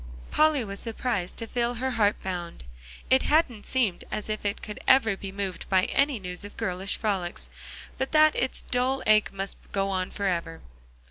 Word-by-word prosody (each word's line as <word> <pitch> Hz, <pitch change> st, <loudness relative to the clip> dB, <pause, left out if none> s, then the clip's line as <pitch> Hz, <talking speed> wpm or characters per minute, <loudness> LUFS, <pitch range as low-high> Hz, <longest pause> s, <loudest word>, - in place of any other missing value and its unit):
Polly 305 Hz, -4 st, +4 dB
was 200 Hz, -2 st, -6 dB
surprised 225 Hz, -5 st, -2 dB
to 230 Hz, -, -2 dB
feel 240 Hz, +1 st, -1 dB
her 260 Hz, +3 st, -1 dB
heart 210 Hz, -3 st, +3 dB
bound. 175 Hz, -, -5 dB, 0.5 s
It 260 Hz, 0 st, +6 dB
hadn't 290 Hz, -9 st, +2 dB
seemed 230 Hz, -9 st, +1 dB
as 215 Hz, -, -4 dB
if 215 Hz, 0 st, -3 dB
it 205 Hz, -1 st, -2 dB
could 210 Hz, -, -7 dB
ever 225 Hz, -6 st, +5 dB
be 195 Hz, 0 st, -7 dB
moved 195 Hz, -1 st, -5 dB
by 185 Hz, -1 st, +4 dB
any 275 Hz, +3 st, +2 dB
news 180 Hz, -1 st, -6 dB
of 205 Hz, -, -10 dB
girlish 185 Hz, +2 st, -1 dB
frolics, 190 Hz, -5 st, -2 dB, 0.5 s
but 265 Hz, -, -1 dB
that 310 Hz, 0 st, +6 dB
its 260 Hz, -, 0 dB
dull 255 Hz, +2 st, 0 dB
ache 215 Hz, 0 st, +4 dB
must 195 Hz, 0 st, -4 dB
go 195 Hz, 0 st, 0 dB
on 185 Hz, -1 st, -1 dB
forever. 170 Hz, -5 st, -2 dB
210 Hz, 180 wpm, -27 LUFS, 190-250 Hz, 0.5 s, It